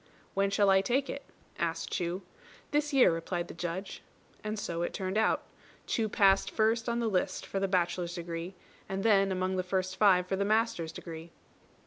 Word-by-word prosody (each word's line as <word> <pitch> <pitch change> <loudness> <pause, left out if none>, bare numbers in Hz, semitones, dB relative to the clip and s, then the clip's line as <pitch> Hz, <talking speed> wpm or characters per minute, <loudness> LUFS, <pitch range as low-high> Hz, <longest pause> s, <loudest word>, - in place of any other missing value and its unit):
"When 195 0 +2
shall 200 0 +4
I 190 0 +5
take 265 +7 0
it?" 280 - -6 0.4
asked 165 -1 -2
Chu. 180 +2 -2 0.5
"This 295 0 +1
year," 270 -8 +6
replied 170 +1 -3
the - - -7
Judge. 175 +3 -5 0.4
And 215 +1 -3
so 170 -4 -3
it 175 - -2
turned 190 0 -3
out. 220 - +2 0.4
Chu 220 -2 0
passed 195 -1 +4
first 225 +1 +1
on 235 0 0
the 235 - 0
list 190 -4 -1
for 195 - -3
the 195 - +1
bachelor's 180 -1 0
degree, 170 +1 -5 0.3
and 195 0 -2
then 195 -3 +4
among 185 0 -1
the - - +2
first 185 0 -2
five 190 -3 +5
for 190 - -1
the 200 - 0
master's 215 -6 +1
degree. 165 0 -8
190 Hz, 185 wpm, -30 LUFS, 175-215 Hz, 0.5 s, year